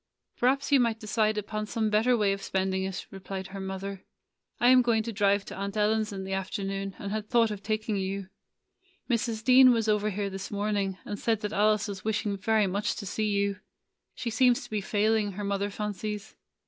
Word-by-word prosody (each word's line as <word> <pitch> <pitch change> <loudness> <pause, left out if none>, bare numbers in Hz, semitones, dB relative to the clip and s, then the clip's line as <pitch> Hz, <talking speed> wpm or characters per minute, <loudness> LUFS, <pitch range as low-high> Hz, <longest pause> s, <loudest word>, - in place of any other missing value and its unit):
"Perhaps 275 +4 +1
you 280 - +6
might 230 -2 +1
decide 215 -1 0
upon 215 +1 -3
some 220 0 -1
bet 215 +2 +3
ter 250 -1 +4
way 205 -3 +2
of 195 - -5
spending 190 0 -1
it," 190 -1 -5
replied 190 0 -6
her 195 +1 -7
mother. 190 0 -5 0.6
"I 240 - +5
am 255 0 +7
going 230 -2 +2
to 230 0 -5
drive 200 0 +2
to - - -8
Aunt 200 +2 -4
Ellen's 215 0 +2
in 195 -1 -5
the 190 0 -4
afternoon, 195 0 -3
and 200 - -5
had 215 0 -3
thought 230 -3 +3
of 205 -2 -5
taking 215 0 -1
you. 195 0 -3 0.8
Mrs. 230 -1 -1
Dean 255 +1 +8
was 225 -2 +1
over 210 0 +2
here 200 0 -3
this 195 0 -6
morning, 205 -2 -1
and 205 - -5
said 225 -3 0
that 210 0 -3
Alice 210 0 +3
was 195 -2 -6
wishing 215 -1 -1
very 215 +2 +2
much 200 +2 -1
to - - -6
see 215 +3 -1
you. 200 -1 0 0.6
She 235 - -3
seems 245 +2 +3
to 245 - -12
be 210 -1 -1
failing, 210 +1 +1
her 205 +2 -5
mother 200 0 -1
fancies. 210 +1 -5
210 Hz, 210 wpm, -28 LUFS, 195-220 Hz, 0.8 s, Dean